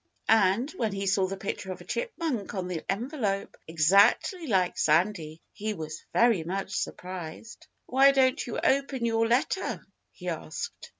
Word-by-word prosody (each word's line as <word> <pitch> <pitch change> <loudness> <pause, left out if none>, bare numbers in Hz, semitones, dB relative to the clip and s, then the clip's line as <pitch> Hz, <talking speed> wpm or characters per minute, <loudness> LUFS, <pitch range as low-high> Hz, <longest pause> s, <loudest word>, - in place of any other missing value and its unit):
And 220 +5 +3
when 220 -4 -1
he 195 0 -3
saw 190 0 +2
the 195 +1 -5
picture 190 -1 -4
of 185 - -7
a - - -11
chipmunk 330 - -3
on 185 -2 -3
the 175 -3 -4
envelope, 210 -3 -2
exactly 200 - +3
like 185 -6 +2
Sandy, 160 -1 +1
he 215 0 -3
was 155 -2 -7
very 230 -8 +3
much 190 +3 -4
surprised. 180 +4 -6 0.2
"Why 270 +2 +5
don't 260 -2 +2
you 235 - -4
open 270 -2 +1
your 225 0 +2
letter?" 265 +10 0 0.3
he - - -11
asked. 470 - -5
205 Hz, 155 wpm, -28 LUFS, 185-250 Hz, 0.3 s, Why